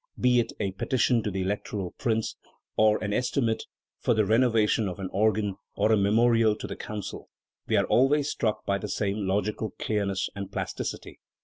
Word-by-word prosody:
Be 125 -1 +4
it 120 - 0
a 100 - -1
petition 120 +4 +1
to 105 - -2
the 95 -1 -2
Electoral 100 -1 -3
Prince, 110 -2 -1 0.4
or 110 0 +4
an 105 0 -1
estimate 120 -1 0 0.3
for 120 - +2
the 110 -1 +3
renovation 110 -1 +3
of 90 - -5
an 95 -1 -4
organ, 105 -1 +1 0.2
or 110 - +2
a - - +6
memorial 110 +2 +3
to - - -7
the - - -5
Council, 105 -2 -7 0.4
we - - +1
are - - +3
always 140 +3 +3
struck 110 -7 -1
by 100 0 0
the 105 - -5
same 100 0 -1
logical 105 +2 -1
clearness 100 -2 -1
and 100 -1 -6
plasticity. - - -5
105 Hz, 180 wpm, -27 LUFS, 100-115 Hz, 0.4 s, a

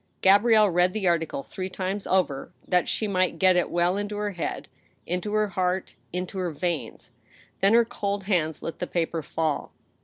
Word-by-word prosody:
Gabrielle 210 +2 +6
read 180 +1 +3
the 210 -4 -1
article 165 -5 0
three 185 +5 -5
times 190 +2 -3
over, 175 -8 0 0.2
that 180 -1 +2
she 215 - 0
might 185 -2 +1
get 185 -1 +4
it 180 - +1
well 175 +2 +1
into 205 0 -3
her 210 0 -1
head, 175 -4 -4 0.4
into 180 +4 -2
her 215 -1 +2
heart, 185 0 -1 0.2
into 180 +2 -4
her 180 -1 -1
veins. 165 0 -4 0.5
Then 200 +3 +4
her 235 0 +6
cold 200 -2 -3
hands 170 -6 0
let 165 - -5
the 180 - -2
paper 165 -1 -1
'fall. 155 0 -2
185 Hz, 180 wpm, -26 LUFS, 175-200 Hz, 0.5 s, Gabrielle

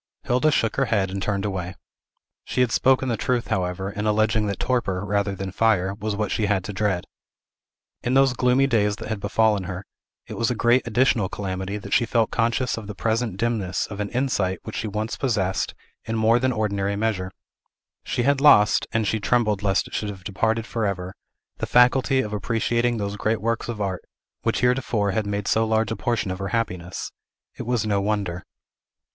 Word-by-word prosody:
Hilda 125 +5 +2
shook 115 -7 +1
her 135 - +3
head, 100 -5 0
and 100 0 -4
turned 100 0 -1
away. 95 -2 -3 0.7
She 125 - -1
had 125 -2 +2
spoken 130 +2 +3
the 120 - +1
truth, 120 +2 -1
however, 95 +1 -1
in 105 +1 -3
alleging 110 0 +2
that 100 - -2
torpor, 105 -7 0
rather 100 -1 0
than 95 0 -5
fire, 95 -3 +2
was 105 0 -3
what 105 -1 -2
she 105 - 0
had 100 -2 +1
to 105 - -6
dread. 95 -3 0 1.0
In 125 +2 0
those 135 -1 +5
gloomy 125 +2 +3
days 105 -6 +2
that - - -8
had 110 -2 -2
befallen 105 -1 +1
her, 90 +1 -6 0.4
it - - -8
was 115 - +2
a 125 - 0
great 120 +3 +3
additional 120 -4 +2
calamity 95 0 -4
that 100 - -6
she 120 - +3
felt 115 -2 +1
conscious 120 +2 0
of 110 -3 -7
the 105 - -6
present 110 -1 -1
dimness 105 -5 -1
of 100 - -6
an 105 -1 -2
insight 110 -8 0
which - - -7
she 110 - -2
once 105 -2 -3
possessed 95 -6 -1 0.3
in 115 - -2
more 110 +2 +4
than 130 +1 +1
ordinary 100 -3 -1
measure. 100 -3 -1 0.7
She 120 - -1
had 140 +1 +2
lost 105 -8 +6
and 115 -1 +1
she 110 +2 0
trembled 105 -2 +1
lest 100 -1 +1
it - - -15
should 105 - -2
have 95 -3 -8
departed 110 +4 0
forever 100 -5 -2 0.4
the - - -3
faculty 130 +2 +4
of 105 -4 -5
appreciating 120 +3 0
those 100 -1 -3
great 110 +1 0
works 115 +2 -2
of 115 -3 -4
art, 95 -3 -2 0.4
which - - 0
heretofore 125 -5 +1
had 105 +1 -1
made 100 -1 -2
so 110 - +3
large 110 -1 +1
a - - -1
portion 115 -5 -1
of 90 - -5
her 100 - -3
happiness. 90 -6 -3 0.4
It 120 - -7
was 120 -3 0
no 100 -2 +1
wonder. 100 -4 -2
105 Hz, 200 wpm, -24 LUFS, 100-120 Hz, 1.0 s, lost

